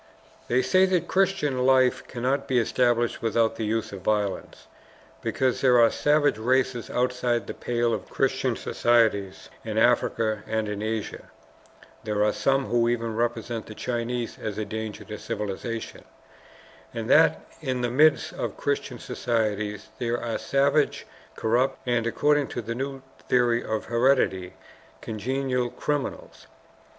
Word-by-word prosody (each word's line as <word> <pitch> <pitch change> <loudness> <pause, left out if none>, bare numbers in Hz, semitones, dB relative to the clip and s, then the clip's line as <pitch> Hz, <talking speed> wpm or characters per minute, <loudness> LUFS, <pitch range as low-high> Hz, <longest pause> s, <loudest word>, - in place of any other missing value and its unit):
They 125 +2 +2
say 185 0 +4
that 185 -2 +2
the - - -14
Christian 190 -9 +1
life 130 0 +3
cannot 130 +3 -1
be 130 - +1
established 120 0 +1
without 115 0 +1
the 110 - -2
use 110 +1 -1
of 95 - -7
violence, 105 0 -2 0.6
because 130 -2 0
there 125 -2 +5
are 115 -1 +6
savage 145 -4 +2
races 125 +1 0
outside 125 -1 0
the - - -6
pale 120 -1 -1
of - - -4
Christian 135 -2 0
societies 110 -7 +1
in - - -4
Africa 110 -2 +2
and 110 -1 -1
in 105 0 -4
Asia 110 0 -4 0.8
(there 105 -1 0
are 105 - +2
some 135 0 +1
who 120 -1 +2
even 115 -2 -1
represent 115 -1 -2
the 110 - -9
Chinese 120 0 -3
as 105 -2 -4
a 110 - -2
danger 110 0 -5
to 105 - -7
civilization), 110 +1 -5 0.9
and - - -3
that - - +5 0.2
in 130 -1 -2
the 120 -1 -1
midst 150 +4 +3
of - - -4
Christian - - -2
societies 105 -3 -2
there 120 0 -1
are 115 -1 -3
savage, 140 +2 +1 0.3
corrupt, 120 +4 +1
and, 120 -2 +1
according 145 +4 +2
to 120 - -5
the 115 +2 -3
new 135 +2 -5 0.3
theory 120 -1 +3
of 110 -1 -3
heredity, 115 -7 +1 0.4
congenital 125 +3 -2
criminals. 145 +3 -4
120 Hz, 145 wpm, -26 LUFS, 110-130 Hz, 0.9 s, are